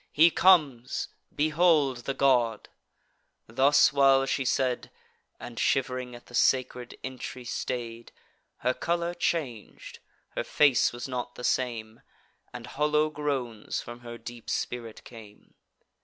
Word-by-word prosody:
He 165 +3 +6
comes; 150 -11 +3 0.3
behold 155 -3 +3
the 135 - -2
god!" 120 -5 +2 0.8
Thus 135 +6 +4
while 135 -1 +5
she 135 0 -1
said, 130 -1 0 0.5
(And 120 -2 -8
shiv'ring 125 -2 0
at 120 - -13
the - - -17
sacred 125 -1 +1
entry 130 -1 -7
stay'd,) 120 -1 -5 0.5
Her 125 - +3
colour 170 +3 -1
chang'd; 145 -11 -4 0.3
her - - -3
face 140 -4 +3
was 120 +2 -6
not 125 -1 -5
the 125 - -9
same, 115 -3 -2 0.5
And - - -8
hollow 150 +2 +1
groans 135 -8 -3
from 120 +1 -9
her 120 -1 -9
deep 120 -1 -10
spirit 115 -2 -4
came. 110 -3 -14
130 Hz, 125 wpm, -27 LUFS, 120-145 Hz, 0.8 s, He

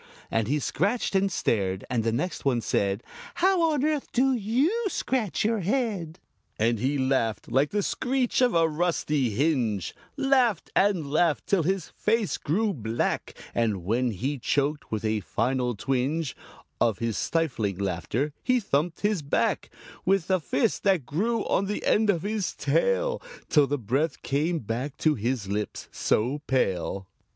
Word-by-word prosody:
And 115 -2 +1
he 145 +4 +1
scratched 200 - 0
and 195 0 +2
stared, 95 - 0
and 120 -3 0
the 115 - +1
next 155 +11 -2
one 125 -4 +2
said 100 0 0 0.3
"How 370 0 +3
on 290 -3 0
earth 305 -2 -1
do 265 +2 +3
you 260 - +1
scratch 245 - -1
your 225 0 +2
head?" 195 -6 -1 0.4
And 115 +1 +1
he 135 +5 0
laughed 130 -5 0
like 135 +4 +3
the 205 0 0
screech 260 +2 0
of 245 -5 +3
a 165 -1 +5
rusty 150 -5 0
hinge 120 - 0 0.2
Laughed 260 - +2
and 180 -8 +2
laughed 160 0 +2
till 195 -3 +2
his 190 +3 -1
face 220 -2 0
grew 205 +7 0
black; 115 - -2 0.2
And 110 -6 0
when 120 +7 +1
he 130 +7 -3
choked, 145 +4 -1
with 110 0 -2
a 110 0 +1
final 125 +4 -1
twinge 135 +6 -1 0.4
Of 115 -5 +2
his 115 0 -2
stifling 125 - -1
laughter, 100 - -2
he 255 -1 +2
thumped 165 -4 -1
his 205 -4 +1
back 140 - 0 0.3
With 190 -1 +1
a 185 - +4
fist 140 -3 0
that 190 -9 +2
grew 215 - 0
on 195 - +1
the 205 - -3
end 215 0 +3
of 170 -5 +2
his 210 -1 -2
tail - - +1 0.3
Till 150 -3 +5
the 145 +2 0
breath 135 +7 -1
came 155 +5 0
back 125 +3 -4
to 155 - +3
his 120 -3 -2
lips 105 +1 -3
so 125 +7 0
pale. 95 -6 0
150 Hz, 160 wpm, -27 LUFS, -, 0.4 s, a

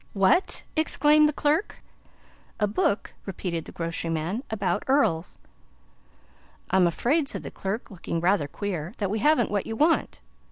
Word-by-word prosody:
"What!" 195 - +2
exclaimed 305 -1 +4
the - - +1
clerk. 300 +5 0 0.8
"A 210 - +3
book," 205 0 0
repeated 175 -3 -4
the - - -9
grocery 165 0 -3
man, 165 +8 -2
"about 200 -5 -1
earls." 260 - +1 1.3
"I'm 185 -2 +5
afraid," 275 - +1
said - - -3
the - - -7
clerk, 200 +5 -4
looking 170 -3 -4
rather 175 -3 +2
queer, 185 +1 -4
"that 200 -3 -2
we 215 - -1
haven't 255 -2 +3
what 205 -2 -1
you 225 - -3
want." 315 +7 +2
205 Hz, 150 wpm, -26 LUFS, 175-275 Hz, 1.3 s, I'm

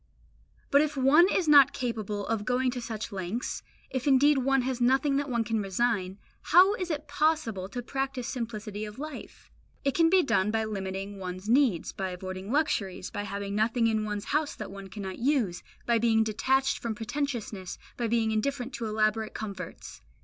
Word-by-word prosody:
But 280 - +6
if 300 -1 -1
one 295 +8 +6
is 365 -5 +1
not 285 -2 +7
capable 215 -5 -3
of 225 -2 -1
going 250 +3 +1
to 245 - -5
such 225 -1 -5
lengths, 195 +5 -4 0.3
if 260 +1 -3
indeed 280 +1 +5
one 270 0 +2
has 255 -1 -2
nothing 270 +3 +3
that 285 0 -2
one 235 -2 +1
can 225 -1 -1
resign, 195 -1 -1 0.2
how 370 +4 +6
is 370 -5 -4
it 305 -2 -3
possible 265 -12 0
to 245 +4 -5
practise 270 -1 -3
simplicity 215 -4 -5
of 210 0 -7
life? 300 -1 -9 0.3
It 275 - +1
can 330 -1 +4
be 370 0 +5
done 210 -7 +2
by 220 0 0
limiting 195 -1 -5
one's 185 +1 -6
needs, 240 - +3
by 190 -1 -3
avoiding 185 +2 -6
luxuries, 200 -11 -1
by 205 - -4
having 200 0 -4
nothing 225 +3 +1
in 220 -1 +1
one's 210 -1 -3
house 300 0 0
that - - -7
one 195 0 -9
cannot 190 -1 -7
use, 240 -9 +1 0.2
by 235 -1 +3
being 225 -1 +3
detached 265 +5 +1
from 230 -2 -3
pretentiousness, 225 -5 -4 0.2
by 235 - -1
being 225 -1 +1
indifferent 250 +3 -2
to 230 - -3
elaborate 215 0 0
comforts. 195 -5 -7
230 Hz, 180 wpm, -28 LUFS, 205-270 Hz, 0.3 s, not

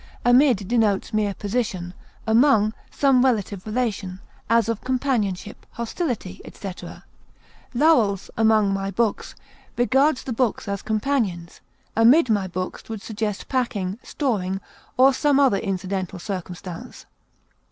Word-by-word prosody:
Amid 245 -5 +4
denotes 220 -2 +1
mere 210 -2 0
position; 200 -5 -3 0.3
among, 220 -2 +4 0.2
some 270 -3 +3
active 210 -6 0
relation, 210 -5 -2 0.3
as 230 0 +3
of 230 -2 -2
companionship, 245 -7 -1
hostility, 235 - -4
etc. 190 -3 -9 0.7
Lowell's 235 - +3
"Among 215 -3 +3
my 195 0 -2
Books" 215 +2 -1 0.4
regards 265 +3 +2
the 255 - -4
books 235 -3 -1
as 200 -1 -3
companions; 215 -7 -2 0.3
amid 240 +4 +5
my 200 -3 +1
books 185 +3 -5
would 220 -2 -6
suggest 215 -2 -4
packing, 215 -6 -2
storing, 195 -9 -2 0.4
or 265 +2 +6
some 285 +1 +2
other 265 -8 +4
incidental 190 0 -3
circumstance. 180 -2 -7
215 Hz, 115 wpm, -23 LUFS, 195-250 Hz, 0.7 s, or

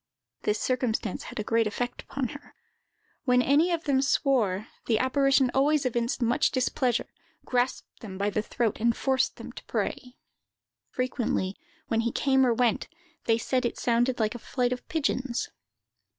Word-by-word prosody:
This 210 - +1
circumstance 245 -6 -1
had - - -7
a - - -1
great 225 +1 +2
effect 245 +3 -3
upon 265 -3 -3
her. 285 0 -11 0.7
When 250 -2 +4
any 300 +7 +4
of 335 -1 -1
them 275 -4 +2
swore, 230 -8 +1 0.2
the 225 - +3
apparition 270 0 +3
always 285 +1 +3
evinced 240 +1 0
much 240 +6 +3
displeasure, 255 -2 0 0.3
grasped 250 0 -1
them 195 -5 -8
by 200 +1 0
the 215 - 0
throat, 220 0 -1
and 230 +1 +2
forced 265 -2 +1
them - - -9
to - - -11
pray. 250 0 -3 0.7
Frequently, 240 -6 -1 0.3
when 225 - +1
he 235 0 -1
came 265 +1 +3
or 240 - +3
went, 235 -3 +1 0.4
they 225 -1 +3
said 255 +2 0
it 240 - -2
sounded 240 +1 +1
like 215 0 +1
a 240 - -7
flight 245 +1 -1
of 250 - -8
pigeons. 265 -5 -1
250 Hz, 165 wpm, -27 LUFS, 230-265 Hz, 0.7 s, When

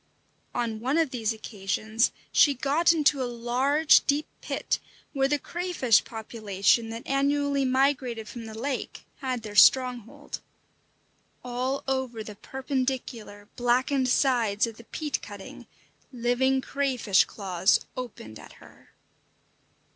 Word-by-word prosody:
On 230 -2 -2
one 260 +7 0
of 320 -5 +2
these 225 -3 -1
occasions 220 +1 -1 0.2
she 285 -2 +5
got 290 +7 +3
into 300 -4 +2
a - - 0
large, 250 +6 +3
deep 290 +1 +2 0.2
pit, - - -2 0.3
where 270 -2 +2
the 295 +1 +1
crayfish 340 -9 +1
population 220 0 0
that 230 +1 -7
annually 280 0 +1
migrated 255 -4 +1
from 230 0 -8
the 220 0 -9
lake 265 +3 -4
had 255 -4 -3
their 210 -1 -7
stronghold. 255 +4 +3 1.0
All 255 +2 -2
over 260 -4 -2
the 210 - -8
perpendicular, 255 -4 -4
blackened 255 +2 +1
sides 240 -6 +2
of 225 -1 -8
the 235 - -14
peat 300 +3 -3
cutting 200 -1 -10 0.4
living 255 +2 +1
crayfish 255 -9 +2
claws 190 -2 +1
opened 205 - -8
at - - -13
her. - - -19
250 Hz, 125 wpm, -27 LUFS, 225-275 Hz, 1.0 s, she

